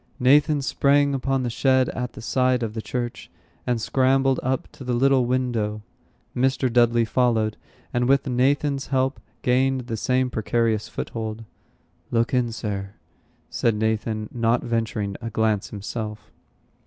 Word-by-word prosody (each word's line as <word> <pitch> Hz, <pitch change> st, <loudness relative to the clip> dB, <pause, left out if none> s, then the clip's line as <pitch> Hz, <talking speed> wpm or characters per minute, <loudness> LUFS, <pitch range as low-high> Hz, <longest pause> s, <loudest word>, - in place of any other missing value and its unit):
Nathan 145 Hz, +3 st, +4 dB
sprang 140 Hz, +1 st, +3 dB
upon 135 Hz, 0 st, 0 dB
the 120 Hz, -, -1 dB
shed 130 Hz, +1 st, +3 dB
at 125 Hz, -1 st, -4 dB
the -, -, -10 dB
side 125 Hz, 0 st, +1 dB
of 110 Hz, -2 st, -3 dB
the 110 Hz, -, -4 dB
church, 120 Hz, +1 st, -4 dB, 0.4 s
and 120 Hz, -2 st, +1 dB
scrambled 135 Hz, +2 st, +2 dB
up 130 Hz, +1 st, -1 dB
to -, -, -11 dB
the 125 Hz, -1 st, -1 dB
little 135 Hz, 0 st, +3 dB
window. 115 Hz, -4 st, -1 dB, 0.5 s
Mr. 130 Hz, -1 st, +1 dB
Dudley 120 Hz, -1 st, +4 dB
followed, 110 Hz, -3 st, +1 dB, 0.4 s
and, 120 Hz, +1 st, +1 dB
with 140 Hz, 0 st, +3 dB
Nathan's 135 Hz, +2 st, +1 dB
help, 130 Hz, -2 st, 0 dB, 0.2 s
gained 130 Hz, +1 st, +2 dB
the 115 Hz, -2 st, -5 dB
same 125 Hz, +3 st, +1 dB
precarious 110 Hz, -1 st, 0 dB
foothold. 110 Hz, -1 st, -5 dB, 0.7 s
"Look 115 Hz, +1 st, 0 dB
in, 125 Hz, -2 st, +1 dB
Sir," 100 Hz, -3 st, -5 dB, 0.6 s
said 115 Hz, -2 st, +1 dB
Nathan, 110 Hz, 0 st, -1 dB
not 115 Hz, 0 st, +1 dB
venturing 110 Hz, -4 st, -2 dB
a 115 Hz, -, -4 dB
glance 110 Hz, -2 st, 0 dB
himself. 105 Hz, +1 st, -6 dB
120 Hz, 140 wpm, -24 LUFS, 110-130 Hz, 0.7 s, Nathan